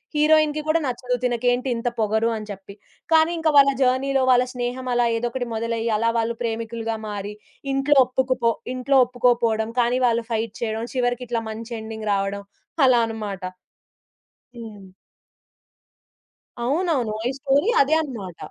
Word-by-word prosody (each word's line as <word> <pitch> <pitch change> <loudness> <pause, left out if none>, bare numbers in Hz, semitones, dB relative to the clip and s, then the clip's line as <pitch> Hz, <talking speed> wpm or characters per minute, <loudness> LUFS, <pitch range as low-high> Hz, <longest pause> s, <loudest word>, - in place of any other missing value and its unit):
హీరోయిన్‌కి 305 0 +3
కూడా 315 +2 +3
నచ్చదు 250 0 -2
తినకేంటి 245 +1 0
ఇంత 230 +1 -3
పొగరు 220 +1 +1
అని 215 -1 -8
చెప్పి. 195 0 -10 0.4
కానీ, 320 +1 +5
ఇంక 325 -1 -1
వాళ్ళ 275 0 +7
జర్నీలో 265 +1 +2
వాళ్ళ 250 0 +4
స్నేహమ‌లా 245 0 -1
ఏదోకటి 240 +2 -3
మొదలయ్యి, 230 0 -2
అలా 230 +2 +1
వాళ్ళు 230 +1 -1
ప్రేమికులుగా 225 0 -3
మారి, 205 0 -5 0.4
ఇంట్లో 275 +2 +2
ఒప్పుకుపో 255 -2 0 0.2
ఇంట్లో 265 +2 +2
ఒప్పుకోపోవడం, 235 -3 +1
కానీ 245 +2 +1
వాళ్ళు 230 -1 0
ఫైట్ 225 0 -2
చేయడం, 225 0 -2
చివరికిట్లా 245 -1 -1
మంచెండింగ్ 220 -1 -6
రావడం 200 0 -2 0.4
అలా 245 -2 +5
అన్నమాట. 210 -4 -6 1.2
హ్మ్. 210 -4 -10 1.8
అవునవును. 280 -5 0
ఈ - - 0
స్టోరీ 285 - +2
అదే 285 +3 +3
అన్నమాట. 210 - -7
240 Hz, 125 wpm, -23 LUFS, 225-260 Hz, 1.8 s, వాళ్ళ